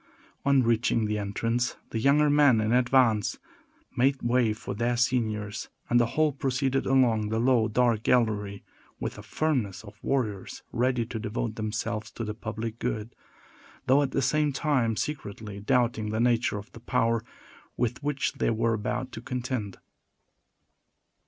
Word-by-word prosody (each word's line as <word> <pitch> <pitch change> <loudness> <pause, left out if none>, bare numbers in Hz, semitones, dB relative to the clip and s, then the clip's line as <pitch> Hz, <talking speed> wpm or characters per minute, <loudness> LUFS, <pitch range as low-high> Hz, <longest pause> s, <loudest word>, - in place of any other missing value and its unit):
On 140 -2 +5
reaching 115 -1 +2
the 105 0 -1
entrance, 115 +4 -1 0.2
the 115 - -1
younger 140 +5 +4
men 145 -5 +5
in 110 0 0
advance 120 -3 +3 0.6
made 135 +2 +2
way 120 -2 +3
for 105 - -5
their 120 +3 0
seniors; 110 -4 -1 0.2
and 120 - +5
the 120 - +3
whole 155 -1 +4
proceeded 135 0 -1
along 120 -5 +3
the 110 - -1
low, 120 -1 +3
dark 115 -1 +2
gallery, 105 -5 +1 0.4
with - - -3
the - - -10
firmness 120 -11 -1
of 105 0 -13
warriors 110 -8 -2
ready 125 -1 +1
to 115 -1 -5
devote 110 0 -3
themselves 110 0 -3
to 115 - -5
the 105 -1 -3
public 115 +1 -5
good, 115 -1 -3 0.7
though, 135 +3 +5
at 140 - 0
the 135 - 0
same 150 +3 +2
time, 130 -5 +1
secretly 105 -7 -5
doubting 115 -1 +1
the 110 +1 -1
nature 120 -2 +2
of 105 +1 -9
the - - -12
power 115 0 +1 0.5
with 120 +1 -1
which 145 -1 -1
they - - 0
were 115 0 +1
about 110 +4 -2
to 115 - -7
contend. 125 -5 -4
115 Hz, 155 wpm, -27 LUFS, 110-130 Hz, 0.7 s, On